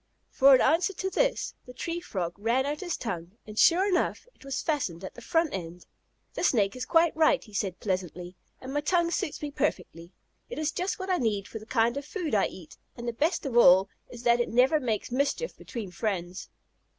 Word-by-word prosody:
For 275 0 +7
an - - +3
answer 330 +7 +3
to 380 +1 -3
this - - 0
the 250 - -11
Tree 335 +5 -3
Frog 185 - -4
ran 235 +5 +1
out 295 +1 -2
his 350 -3 -3
tongue, 175 -5 -5
and, 215 0 -6
sure 365 +4 +5
enough, 370 +4 0
it - - -21
was 275 -1 -3
fastened 225 - -2
at 190 - -7
the - - -12
front 325 -1 +1
end. 175 -1 -6 0.5
"The - - -4
Snake 215 - +2
is 255 0 -5
quite 330 -1 +3
right," 315 0 +3
he 215 - -17
said 195 -3 -2
pleasantly, 180 -2 -4 0.2
"and 260 +1 -7
my 290 - 0
tongue 340 +2 +1
suits 305 - -2
me 295 - -3
perfectly. 180 - -3 0.4
It 485 - -6
is 310 0 0
just 365 +2 -2
what 375 0 -4
I 365 - +3
need 210 -5 -1
for 220 - -7
the 215 - -14
kind 235 +1 +1
of 285 - -3
food 330 - -4
I 200 -2 +3
eat, 175 -4 -13 0.2
and 235 0 -6
the 235 - -1
best 320 +7 0
of 265 -4 -3
all 190 -4 +7 0.2
is 240 -1 -10
that 240 0 +4
it 240 - 0
never 255 +6 +4
makes 235 -4 -2
mischief 280 - -1
between 220 -7 -7
friends." 180 -2 -3
250 Hz, 220 wpm, -28 LUFS, 200-320 Hz, 0.5 s, For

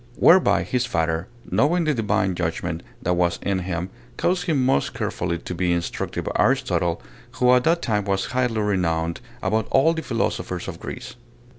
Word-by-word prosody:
Whereby 100 - +5
his 125 +7 -1
father, 80 -4 -1 0.2
knowing 170 +4 +3
the 155 -1 +2
divine 110 -5 +1
judgment 85 -1 -2 0.2
that 90 - +1
was 85 -1 +1
in 100 -1 0
him, 90 0 -3 0.3
caused 180 0 +1
him 140 -6 +2
most 135 - +1
carefully 85 -1 -2
to 85 - -6
be 90 0 0
instructed 85 0 -2
by - - -3
Aristotle, 85 -5 +1 0.3
who 125 0 +4
at 125 +2 +3
that 170 +1 +2
time 105 -3 0
was 95 -1 0
highly 125 -3 0
renowned 85 -5 0 0.2
above 110 +3 +1
all 150 +5 +4
the 160 - -3
philosophers 115 - -2
of 85 -3 -6
Greece. 125 -1 -7
100 Hz, 170 wpm, -23 LUFS, 85-125 Hz, 0.3 s, Whereby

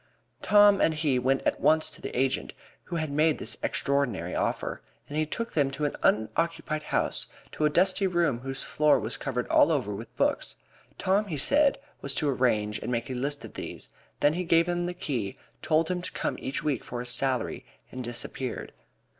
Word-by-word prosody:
Tom 205 -1 +6
and 160 - +3
he 150 -5 +1
went 135 +2 +1
at - - 0
once 155 0 +4
to - - -9
the - - -4
agent 130 +1 0 0.3
who - - -5
had 155 -3 -2
made 155 +1 +3
this - - -3
extraordinary 120 -11 0
offer, - - -2 0.3
and 145 - -7
he 155 0 +1
took 230 +8 -4
them 145 -3 +2
to 150 +2 -2
an 145 - -1
unoccupied 155 +7 +1
house, - - -1 0.2
to 155 - 0
a - - +5
dusty 190 +5 +3
room 170 -9 +1
whose 135 +1 -5
floor 150 -1 +3
was 110 +2 -3
covered 125 -3 -3
all 160 - +5
over 125 -9 0
with 110 +3 -9
books. - - 0 0.4
Tom, 200 +3 +1
he 160 -6 -3
said, 280 - +3 0.2
was 140 -1 -1
to 150 - +1
arrange 110 -6 +1
and - - -4
make 120 +1 -2
a - - -2
list 140 +3 -3
of - - -11
these. - - -7 0.3
Then 145 - +4
he 180 +2 -2
gave 165 0 +4
him 175 0 0
the 180 - -4
key, 120 - -3 0.2
told 160 +2 +2
him 180 -1 -1
to 180 - -5
come - - -2
to - - -12
him - - -6
each 135 - -2
week 145 -6 0
for 120 - -5
his 125 - -3
salary, 125 -1 0 0.3
and 130 0 -5
disappeared. 120 +1 -4
145 Hz, 205 wpm, -28 LUFS, 125-165 Hz, 0.4 s, Tom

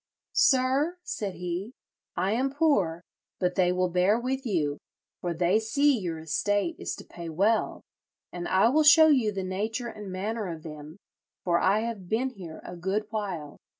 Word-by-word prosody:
'Sir,' 270 +6 +3
said 200 - -4
he, 180 +6 -4 0.4
'I 185 +3 +1
am 260 +5 0
poor; 195 - +2 0.4
but 180 -1 +1
they 180 -1 +2
will 185 0 +1
bear 180 +5 +2
with 260 +2 -2
you, 150 -8 0 0.4
for 175 - -2
they 175 +5 +2
see 280 +6 +2
your 175 -7 -3
estate 205 - 0
is - - -3
to - - -10
pay 170 -1 -8
well; 200 +8 +1 0.5
and 175 -1 -5
I 190 +4 +4
will 305 +5 +3
show 315 +1 +8
you 250 -8 +3
the 195 -2 -4
nature 215 +6 -3
and 210 -3 -8
manner 210 +3 -3
of 165 -3 -6
them, 155 +1 -9 0.5
for 170 -1 +2
I 200 +3 +3
have 220 -6 -5
been 255 +4 0
here 180 -8 -10
a 180 - -8
good 190 +5 -2
while. 185 -9 -4
195 Hz, 175 wpm, -27 LUFS, 175-235 Hz, 0.5 s, show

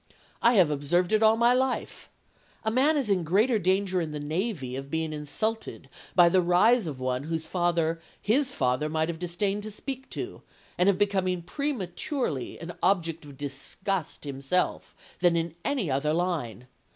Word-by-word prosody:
I 235 - +5
have 180 -8 +5
observed 175 +6 +1
it 215 - +4
all 220 0 +5
my 235 +1 +5
life. 260 0 -1 0.5
A 220 - 0
man 280 +6 +3
is 255 -8 0
in 185 -3 +2
greater 215 +8 +3
danger 190 0 +1
in 160 - -3
the 150 -1 -5
navy 155 - -2
of 135 +1 -6
being 160 0 -2
insulted 215 +10 -3 0.3
by 175 -2 +7
the 185 +2 +4
rise 185 +5 +4
of 140 -4 -5
one 130 +1 -2
whose 160 0 -2
father 165 -1 0 0.2
his 255 +5 +2
father 130 - 0
might 160 +1 0
have 165 -1 -4
disdained 195 +4 -1
to 215 - -5
speak 265 +5 -6
to, - - -6 0.3
and 180 +2 +3
of 195 - +2
becoming 185 -3 0
prematurely 195 - -3
an 170 +1 -7
object 170 -4 +1
of 140 -2 -12
disgust 145 +6 -3
himself, 140 +5 -2 0.2
than 175 -1 +4
in 165 -1 -1
any 240 - -1
other 145 +3 +1
line. 160 -9 -2
175 Hz, 170 wpm, -27 LUFS, 155-210 Hz, 0.5 s, by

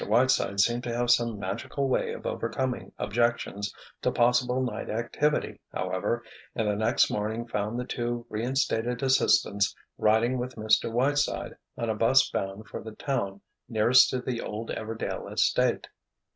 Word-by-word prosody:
Whiteside 115 -3 +2
seemed 120 +4 +3
to 120 -1 -2
have 120 0 +2
some 120 -2 +2
magical 100 +8 -3
way 130 - 0
of - - -9
overcoming 130 -2 -2
objections 100 -2 0 0.3
to - - +1
possible 125 +1 +2
night 130 -1 -3
activity, 120 +7 -1
however; 115 +6 -2 0.3
and 110 -2 0
the 105 - +1
next 110 +3 +2
morning 110 +3 -2
found 110 +1 -2
the 125 - -3
two 120 -1 -3
reinstated 120 +1 -1
assistants 100 -6 +3 0.2
riding 115 +4 +3
with 125 +1 -4
Mr. 110 +1 +2
Whiteside 140 +5 0 0.2
on 115 - -2
a 110 - +1
'bus 115 +5 +4
bound 95 +2 -4
for - - -6
the 110 0 -8
town 100 -8 -2 0.3
nearest 115 +2 +5
to 130 - -1
the 125 -1 -3
old 110 +2 -5
Everdail 110 0 -4
estate. - - +2
115 Hz, 150 wpm, -28 LUFS, 110-125 Hz, 0.3 s, nearest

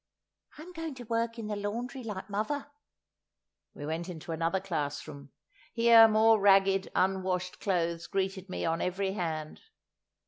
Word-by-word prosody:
"I'm 335 +4 -10
going 325 -4 -5
to 250 - -9
work 230 0 -1
in 225 - -5
the 210 0 -3
laundry 235 +6 -4
like 205 -4 -6
muvver!" 215 +8 -2 1.1
We 145 - -7
went 165 +4 -3
into 165 -1 -7
another 165 +3 0
classroom; 145 -5 -5 0.4
here 230 -1 +8
more 220 0 +4
ragged 195 -1 +4
unwashed 185 -1 0
clothes 170 -4 -1
greeted 190 0 -2
me - - -3
on 165 0 0
every 190 +2 -1
hand. 160 -5 -4
195 Hz, 140 wpm, -30 LUFS, 170-225 Hz, 1.1 s, here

